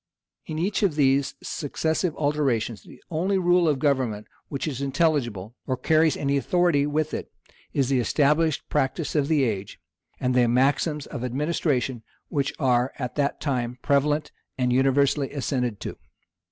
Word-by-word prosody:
In 155 - -4
each 190 +7 0
of 190 -8 +2
these 140 -1 +2
successive 160 +3 -1
alterations, 135 - 0
the - - -16
only 185 +5 +1
rule 175 -2 +3
of 145 - +1
government 130 -7 0 0.2
which 140 +2 -4
is 140 -3 -4
intelligible, 135 - 0
or 130 - 0
carries 155 +4 +3
any 140 0 0
authority 165 -1 +2
with 155 +1 -1
it, - - -5 0.4
is 135 -2 0
the 135 -2 +2
established 150 +5 +2
practice 140 +4 -1
of 145 -3 +1
the 150 -3 +3
age, 105 -6 -3 0.4
and 125 -1 0
the 125 -1 +4
maxims 140 +5 +1
of 120 - -6
administration 130 -2 -1 0.3
which 140 -1 0
are 125 -2 +2
at 125 -2 -4
that 140 0 -1
time 125 -4 -2
prevalent 145 +2 +1 0.3
and 125 -1 +1
universally 135 +2 +2
assented 125 -6 -2
to. - - -5
140 Hz, 155 wpm, -25 LUFS, 125-155 Hz, 0.4 s, the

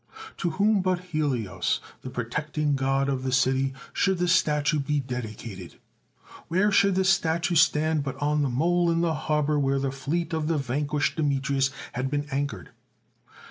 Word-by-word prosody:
To 175 - -1
whom 205 0 +3
but 185 -1 +1
Helios, 120 - -1 0.2
the 130 - -7
pro 125 -2 -3
tecting 150 +3 -1
god 135 0 +1
of 135 -2 -1
the 130 0 -2
city, 135 +1 +2 0.2
should 190 -1 +1
the 180 0 0
statue 150 -3 +2
be 145 +1 0
dedi 125 -5 -5
cated? 95 -6 -9 0.7
Where 190 +5 +2
should 200 -1 +4
the 190 - +2
statue 175 -2 +2
stand 155 -1 +3
but 135 -2 -4
on 150 +1 +1
the 140 - +1
mole 170 +7 +2
in 165 0 +1
the 170 -1 +1
harbour 150 -1 0
where 135 -1 +1
the 135 -1 -1
fleet 155 +6 -3
of 160 -1 -1
the 165 -1 +1
van 140 +2 -2
quished 150 +2 0
Demetrius 140 -2 +1 0.2
had 130 +2 -2
been 145 +1 -1
anchored? 135 -9 -3
145 Hz, 180 wpm, -26 LUFS, 135-165 Hz, 0.7 s, should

